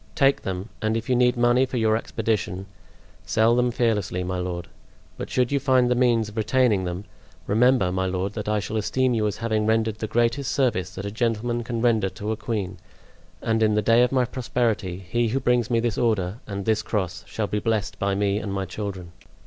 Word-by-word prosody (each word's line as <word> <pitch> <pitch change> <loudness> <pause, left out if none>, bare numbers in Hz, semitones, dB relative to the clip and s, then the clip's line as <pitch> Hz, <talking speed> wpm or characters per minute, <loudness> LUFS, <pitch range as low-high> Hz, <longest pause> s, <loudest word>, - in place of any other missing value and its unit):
Take 135 0 +3
them, 95 +3 -4
and 110 +1 +1
if 115 +2 -5
you - - +4
need 125 0 +3
money 120 +2 +4
for 125 - -4
your 110 -1 +3
expedition, 110 -4 -2 0.6
sell 115 +2 +3
them 125 0 +2
fearlessly, 105 -7 0
my 90 0 -3
lord. 90 -1 -4 0.5
But - - -6
should 125 0 +1
you 140 - +2
find 130 -3 +3
the - - +6
means 120 -3 +2
of 105 +1 -11
retaining 110 -3 +2
them, 90 +2 -4 0.4
remember, 115 -3 +3
my 95 +1 0
lord, 95 +2 -2
that 105 -1 -4
I 105 0 +1
shall 110 +2 -3
esteem 130 +4 +1
you 110 -2 +1
as 105 - -3
having 110 -2 0
rendered 110 -1 +1
the 110 - -2
greatest 120 +4 +1
service 95 -9 0
that 95 - -5
a 100 - -3
gentleman 120 +1 -1
can 115 0 -3
render 110 -5 +3
to 100 +4 -5
a - - 0
queen; 105 -4 -4 0.6
and 110 0 +1
in 110 -1 +3
the 105 - +1
day 115 +1 +5
of 125 - +3
my 130 -2 +2
prosperity 115 -7 -2
he 120 +5 +1
who 125 +5 0
brings 125 -2 +1
me 115 -2 +2
this 115 -2 -1
order 110 -3 0
and 100 -2 -5
this 110 -1 +2
cross 90 -6 -3
shall 110 - -2
be 105 +1 -2
blessed 110 -1 -1
by 100 0 0
me 100 0 +1
and 105 -2 -5
my 95 0 -2
children." 95 -2 -6
110 Hz, 215 wpm, -24 LUFS, 100-120 Hz, 0.6 s, the